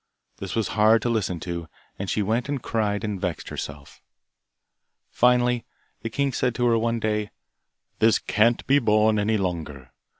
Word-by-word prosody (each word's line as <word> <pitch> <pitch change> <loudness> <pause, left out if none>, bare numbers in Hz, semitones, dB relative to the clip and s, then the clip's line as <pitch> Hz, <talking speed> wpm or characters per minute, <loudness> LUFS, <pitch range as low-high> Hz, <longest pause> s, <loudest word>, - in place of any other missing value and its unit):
This - - -6
was 115 -2 0
hard 110 +1 +4
to 120 - 0
listen 95 -6 -1
to, 85 -2 -5 0.3
and 95 -1 -4
she 105 - 0
went 115 +6 -1
and 145 -1 -1
cried 105 -2 -1
and 105 -3 -3
vexed 90 -4 -3
herself. 70 -1 -8 1.1
Finally, 125 -1 +3 0.4
the 115 - -4
king 140 +3 -1
said 125 -2 0
to 125 - 0
her 115 -1 +4
one 115 +1 0
day, 105 -1 -1 0.7
'This 110 0 +5
can't 115 +3 +1
be 140 +2 +4
borne 110 -2 +3
any 110 +1 +1
longer. 80 -9 -4
110 Hz, 165 wpm, -24 LUFS, 100-115 Hz, 1.1 s, This